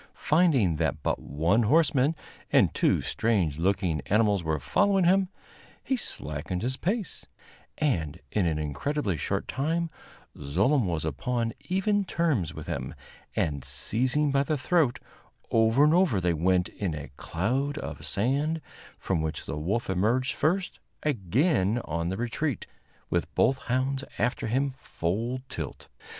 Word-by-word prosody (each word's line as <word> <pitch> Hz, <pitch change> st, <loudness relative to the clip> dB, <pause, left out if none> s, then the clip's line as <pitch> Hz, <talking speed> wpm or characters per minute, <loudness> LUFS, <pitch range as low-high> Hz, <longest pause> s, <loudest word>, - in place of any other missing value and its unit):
Finding 145 Hz, -, +3 dB
that 75 Hz, -2 st, -1 dB
but -, -, 0 dB
one 85 Hz, +10 st, +1 dB
horseman 145 Hz, +3 st, +3 dB, 0.4 s
and -, -, +4 dB
two -, -, +2 dB
strange 90 Hz, -10 st, 0 dB
looking 90 Hz, -4 st, +1 dB
animals 105 Hz, 0 st, +3 dB
were 80 Hz, -1 st, 0 dB
following 195 Hz, -, +2 dB
him, 190 Hz, +2 st, +4 dB, 0.5 s
he 265 Hz, -, 0 dB
slackened 90 Hz, -, -4 dB
his 130 Hz, +2 st, -1 dB
pace, 195 Hz, -, -3 dB, 0.5 s
and 85 Hz, -, 0 dB
in 100 Hz, -5 st, +1 dB
an 80 Hz, -2 st, 0 dB
incredibly 95 Hz, -, -1 dB
short -, -, -2 dB
time 165 Hz, +4 st, -1 dB, 0.4 s
Zlooem 100 Hz, -, +1 dB
was 80 Hz, -3 st, -1 dB
upon 115 Hz, -, -1 dB, 0.2 s
even 200 Hz, +2 st, +2 dB
terms 160 Hz, -, 0 dB
with -, -, -8 dB
him, -, -, -4 dB, 0.4 s
and, 70 Hz, -4 st, 0 dB
seizing 120 Hz, -, 0 dB
by 140 Hz, 0 st, +3 dB
the 150 Hz, +2 st, 0 dB
throat, 135 Hz, -3 st, +2 dB, 0.5 s
over 115 Hz, +4 st, +4 dB
and 150 Hz, +1 st, +5 dB
over 175 Hz, -, +3 dB
they 90 Hz, -1 st, +1 dB
went 90 Hz, +3 st, +2 dB
in 90 Hz, -6 st, -3 dB
a 70 Hz, -3 st, -7 dB
cloud 130 Hz, -, -1 dB
of -, -, -6 dB
sand, 140 Hz, +9 st, 0 dB, 0.4 s
from 90 Hz, -4 st, -1 dB
which 80 Hz, 0 st, -3 dB
the -, -, -4 dB
wolf 95 Hz, +10 st, -1 dB
emerged 110 Hz, +8 st, +1 dB
first, 180 Hz, +5 st, 0 dB, 0.2 s
again 120 Hz, -, +2 dB
on 85 Hz, +1 st, -2 dB
the 95 Hz, -, -2 dB
retreat, 120 Hz, +3 st, -2 dB, 0.5 s
with -, -, 0 dB
both 135 Hz, 0 st, +3 dB
hounds 130 Hz, +2 st, -1 dB
after 125 Hz, -1 st, 0 dB
him 135 Hz, +4 st, 0 dB
full 115 Hz, +10 st, -2 dB
tilt. 80 Hz, -, -6 dB
115 Hz, 140 wpm, -28 LUFS, -, 0.5 s, and